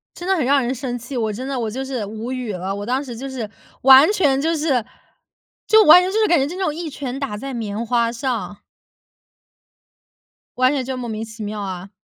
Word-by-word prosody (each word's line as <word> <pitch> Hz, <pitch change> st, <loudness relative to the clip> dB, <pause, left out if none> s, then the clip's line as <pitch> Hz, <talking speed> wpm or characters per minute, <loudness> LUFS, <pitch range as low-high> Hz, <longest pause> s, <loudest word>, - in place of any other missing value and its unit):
真 350 Hz, -, -7 dB
的 385 Hz, -, +3 dB
很 305 Hz, -, 0 dB
让 275 Hz, +1 st, +3 dB
人 250 Hz, +2 st, -1 dB
生 245 Hz, -1 st, -4 dB
气， 250 Hz, +3 st, -8 dB
我 220 Hz, -3 st, -1 dB
真 250 Hz, +6 st, -6 dB
的 270 Hz, -1 st, -3 dB
我 225 Hz, -2 st, -2 dB
就 260 Hz, +5 st, -4 dB
是 260 Hz, -5 st, -3 dB
无 220 Hz, +4 st, -6 dB
语 250 Hz, -4 st, -4 dB
了。 190 Hz, +1 st, -4 dB
我 205 Hz, -, -5 dB
当 255 Hz, +3 st, 0 dB
时 245 Hz, -4 st, -8 dB
就 270 Hz, +4 st, -6 dB
是 240 Hz, -5 st, -5 dB, 0.3 s
完 270 Hz, +5 st, +8 dB
全 285 Hz, -9 st, +2 dB
就 325 Hz, +3 st, 0 dB
是 280 Hz, -7 st, 0 dB, 0.8 s
就 440 Hz, 0 st, +6 dB
完 355 Hz, +4 st, +9 dB
全 365 Hz, -, -1 dB
就 435 Hz, -, 0 dB
是 435 Hz, -, +4 dB
感 345 Hz, -3 st, +4 dB
觉 270 Hz, -, +2 dB
就 285 Hz, -, -4 dB
是 360 Hz, -, -6 dB
那 385 Hz, -, -1 dB
种 305 Hz, -4 st, -1 dB
一 330 Hz, -1 st, -5 dB
拳 270 Hz, -2 st, -5 dB
打 270 Hz, -7 st, -4 dB
在 270 Hz, +4 st, -6 dB
棉 220 Hz, -1 st, -4 dB
花 235 Hz, 0 st, +1 dB
上。 235 Hz, -4 st, -4 dB, 2.0 s
完 255 Hz, +1 st, +4 dB
全 275 Hz, -3 st, -1 dB
就 260 Hz, +1 st, -4 dB
莫 245 Hz, -1 st, -5 dB
名 220 Hz, 0 st, -4 dB
其 220 Hz, -1 st, -10 dB
妙 210 Hz, 0 st, -4 dB
啊。 190 Hz, -1 st, -6 dB
255 Hz, 255 characters per minute, -20 LUFS, 225-280 Hz, 2.0 s, 完